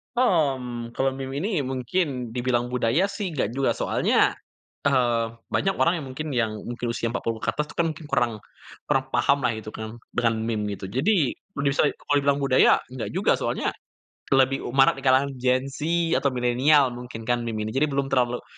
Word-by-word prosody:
Hmm, 135 - 0
kalau 135 +2 +1
meme 135 0 -5
ini 185 -8 -1
mungkin 130 0 -2
dibilang 120 0 -1
budaya 125 - +1
sih 200 -3 -4
nggak 130 -7 0
juga, 135 +3 0
soalnya, - - +1 0.5
eee, 120 -4 +2 0.2
banyak 195 0 +1
orang 170 0 +2
yang 140 - -7
mungkin 150 +3 -5
yang 115 -4 0
mungkin 120 0 -5
usia 115 0 -2
40 115 -2 -2
ke - - +1
atas 150 0 -2
itu - - -13
kan 170 -1 +2 0.2
kurang 125 -4 +1 0.6
kurang 135 -3 +2
paham 140 - +3
lah 125 - +3
gitu 110 -1 -7
kan, 110 +2 -7 0.2
dengan 115 -1 +2
meme, 110 -2 -1
gitu. 95 -1 -6
Jadi, 145 - +2 0.2
kondisai 140 -2 +1
kalau 145 - -1
dibilang 140 0 +2
budaya 135 -2 +4
enggak 125 -1 -6
juga. - - +2
Soalnya - - -2 0.7
lebih 135 0 +2
u 120 - -6
marak 135 0 +5
di - - -13
kalangan 135 +2 +4
Gen 130 +1 +2
Z, - - -9 0.4
atau 145 - +1
Milenial 130 +3 +3
mungkin 120 -2 -8
kan 120 +1 +1
meme 110 -2 -2
ini. 110 - -4
Jadi 140 +6 +1
belum 140 -1 -2
terlalu 125 -2 +1
130 Hz, 185 wpm, -25 LUFS, 120-140 Hz, 0.7 s, marak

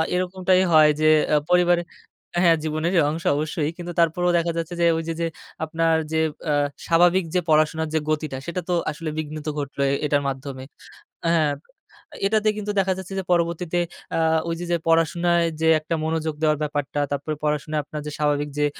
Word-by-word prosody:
এরকমটাই 185 0 +1
হয় 155 -1 +7
যে 155 - +1 0.3
আ - - +6
পরিবারে 175 -1 +4 0.6
হ্যাঁ 165 -1 +6
জীবনেরই 160 +3 0
অংশ 165 +2 -4
অবশ্যই। 155 0 -1
কিন্তু 175 0 -6
তারপরেও 175 +2 +2
দেখা 170 0 0
যাচ্ছে 165 +1 -3
যে - - +4
ওইযে 165 0 -3
যে 165 - +1 0.4
আপনার 165 0 +1 0.2
যে 160 - +1 0.3
আ - - +2 0.3
স্বাভাবিক 175 +2 +4
যে - - +4
পড়াশোনার 155 +1 +2
যে 160 - +2
গতিটা 155 -3 -1
সেটা 175 +1 -3
তো - - +2 0.2
আসলে 155 +1 -5
বিঘ্নিত 155 0 -5
ঘটলো 140 0 -4 0.2
এটার 145 -1 +2
মাধ্যমে 135 -1 -5 0.7
হ্যাঁ 155 -3 +2 0.7
এটাতে 215 +1 +2
কিন্তু 210 0 -3
দেখা 190 0 +1
যাচ্ছে 190 +1 -7
যে - - -7
পরবর্তীতে 170 0 0 0.4
আ - - +1 0.3
ওইযে 165 +1 -3
যে - - +4
পড়াশোনায় 170 +1 +3 0.2
যে 160 - +3
একটা 160 +2 -3
মনোযোগ 160 -1 -1
দেওয়ার 155 -1 +3
ব্যাপারটা 145 -1 -2
তারপরে 145 +2 -2
পড়াশোনায় 150 0 -1
আপনার 150 0 -6
যে - - -3
স্বাভাবিক 145 -1 0
যে 150 - +3
160 Hz, 170 wpm, -23 LUFS, 150-175 Hz, 0.7 s, হয়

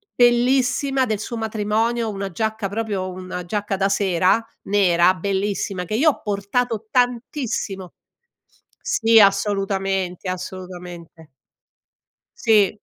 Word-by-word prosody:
bellissima, 255 +2 +3
del 215 -3 -2
suo 235 +2 -5
matrimonio, 220 +1 -1
una 195 -2 -4
giacca 220 +1 -2
proprio 200 -3 -3
una 185 -1 -7
giacca 205 +1 -2
da 195 +1 +1
sera 190 +2 +2 0.2
nera, 185 -3 +3
bellissima, 195 0 -2
che 215 - -6
io 300 +8 +4
ho - - -3
portato 220 +2 -2
tantissimo 245 - -1 0.9
sì 225 - +4
assolutamente, 195 -2 +1
assolutamente. 180 -3 -8 1.1
Sì. 215 -3 +3
205 Hz, 100 wpm, -21 LUFS, 185-225 Hz, 1.1 s, io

